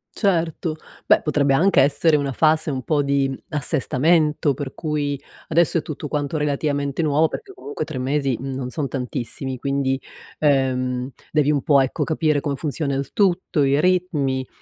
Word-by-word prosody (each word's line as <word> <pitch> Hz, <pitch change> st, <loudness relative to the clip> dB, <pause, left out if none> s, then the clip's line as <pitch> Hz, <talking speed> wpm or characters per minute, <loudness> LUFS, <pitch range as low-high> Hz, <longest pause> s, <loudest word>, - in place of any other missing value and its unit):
Certo, 170 Hz, -5 st, 0 dB, 0.3 s
beh -, -, +5 dB
potrebbe 140 Hz, -2 st, +2 dB
anche 175 Hz, -1 st, +4 dB
essere 150 Hz, +3 st, +3 dB
una 140 Hz, -2 st, -2 dB
fase 155 Hz, +2 st, +2 dB
un 130 Hz, -3 st, -3 dB
po' 150 Hz, +3 st, +1 dB
di 140 Hz, -1 st, 0 dB
assestamento, 150 Hz, +2 st, +1 dB
per 135 Hz, -1 st, -6 dB
cui 145 Hz, -3 st, -2 dB, 0.3 s
adesso 165 Hz, +1 st, +2 dB
è -, -, -4 dB
tutto 150 Hz, 0 st, -6 dB
quanto 145 Hz, +1 st, -2 dB
relativamente 145 Hz, 0 st, -1 dB
nuovo, 155 Hz, 0 st, +3 dB
perché 390 Hz, -, -7 dB
comunque 145 Hz, -, -5 dB
3 155 Hz, -3 st, -6 dB
mesi 135 Hz, -1 st, 0 dB
non 130 Hz, -1 st, -4 dB
sono 145 Hz, +1 st, -3 dB
tantissimi; 130 Hz, 0 st, -4 dB
quindi, 135 Hz, 0 st, -1 dB, 0.4 s
ehm, 130 Hz, -3 st, +1 dB, 0.2 s
devi 150 Hz, -2 st, +2 dB
un 145 Hz, -3 st, +1 dB
po', 140 Hz, -2 st, +5 dB
ecco, 130 Hz, -, -1 dB
capire 155 Hz, -2 st, +1 dB
come 145 Hz, -1 st, -2 dB
funziona 145 Hz, -1 st, -2 dB
il 135 Hz, 0 st, -3 dB
tutto, 185 Hz, -6 st, +1 dB
i 140 Hz, +2 st, +3 dB
ritmi. 155 Hz, -8 st, 0 dB
145 Hz, 160 wpm, -22 LUFS, 135-155 Hz, 0.4 s, beh